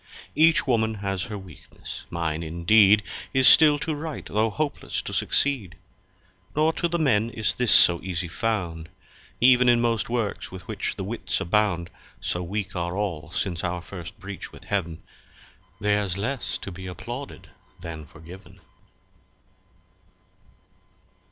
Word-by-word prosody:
Each 165 +1 +4
Woman 110 -3 +1
has 95 -4 -3
her 105 - -6
weaknesse; 90 -8 -10
mine 80 -2 -2
indeed 95 +6 +4 0.3
Is 130 -1 +5
still 150 -2 +8
to 155 +2 -2
write 150 0 -6
tho' 110 +2 +1
hopelesse 150 +6 -3
to - - -6
succeed. 125 - +1 0.8
Nor 155 +2 +3
to 170 - 0
the 170 0 -1
Men 115 -8 +2
is 110 -3 0
this 125 -3 +1
so 85 -1 +7
easy 90 -1 -3
found; 85 -5 -2 0.5
Ev'n 125 0 +6
in 120 -1 +5
most 115 -3 0
Works 115 -4 -2
with 95 0 -10
which - - -3
the - - -4
Witts - - -2
abound 90 -3 0 0.3
(So 90 - -2
weak 95 +2 -4
are 85 +1 -2
all 85 -6 -3
since 85 0 -2
our 90 -1 -2
first 90 -4 -9
breach 95 0 -8
with - - -13
Heav'n) 85 -6 -3 0.8
Ther's 105 -3 0
less 125 +6 -2
to 100 - -8
be 95 +1 -8
Applauded 100 - -8 0.3
then 80 -3 -7
forgiven. 90 +5 -13
100 Hz, 140 wpm, -25 LUFS, 85-120 Hz, 0.8 s, still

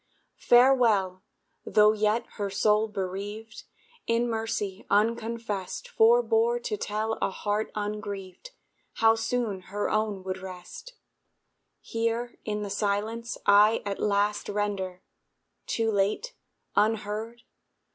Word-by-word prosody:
Farewell 235 -7 +4 0.4
tho' 210 0 +5
yet 215 +2 +1
her 205 -2 -2
soul 210 +2 +2
bereaved, 205 +2 -6 0.4
In 230 +1 +2
mercy 220 -4 -3
unconfessed 225 - -1
Forbore 470 0 +3
to 455 -4 -2
tell 220 - -2
a - - +2
heart 210 +2 -2
ungrieved 205 - -5 0.4
How 225 0 +4
soon 225 -2 -1
her 205 +1 -2
own 215 -3 -1
would 190 0 -4
rest 190 - -10 0.9
Here 230 +1 -2
in 210 -1 -3
the 200 - -5
silence, 215 +3 -2
I 205 +2 +5
at 200 -1 -3
last 205 0 0
Render 200 -3 -2 0.6
(too 225 -1 0
late? 210 - 0 0.4
unheard?) 220 +2 -1
215 Hz, 105 wpm, -27 LUFS, 200-230 Hz, 0.9 s, tho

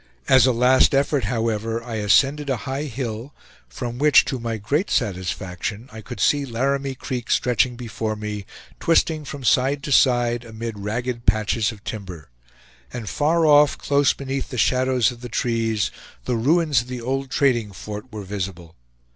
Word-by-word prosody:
As 130 -1 +6
a - - +4
last 125 +3 +4
effort, 140 -3 +1
however, 115 0 -1
I 115 -2 -5
ascended 140 +7 +2
a 130 - +1
high 135 +2 -3
hill, 125 -1 -5 0.3
from 120 - -6
which, 150 0 +6
to 130 - -3
my 115 -1 -3
great 140 - -1
satisfaction, 95 +3 -3
I 110 0 -9
could 120 0 -9
see 145 +8 +3
Laramie 135 +2 -1
Creek 125 -2 -5
stretching 125 0 +2
before 115 -2 -4
me, 105 -2 -6 0.3
twisting 160 -2 +2
from 140 -1 -7
side 140 +3 +2
to 145 - -4
side 120 -3 +3
amid 115 -1 -7
ragged 120 +4 -4
patches 110 +2 +2
of 105 -2 -14
timber; 90 - -7 0.6
and 120 -3 -6
far 160 +6 +1
off, 150 -1 +5
close 140 0 +2
beneath 135 0 -4
the 125 - -6
shadows 130 +1 +2
of 120 -1 -12
the 120 - -7
trees, 115 -3 0 0.3
the 125 - 0
ruins 145 +2 +2
of 120 - -12
the 125 -1 -5
old 135 +3 -3
trading 125 -6 +1
fort 105 +5 -8
were 105 -2 -6
visible. 95 -4 -6
120 Hz, 165 wpm, -22 LUFS, 110-135 Hz, 0.6 s, As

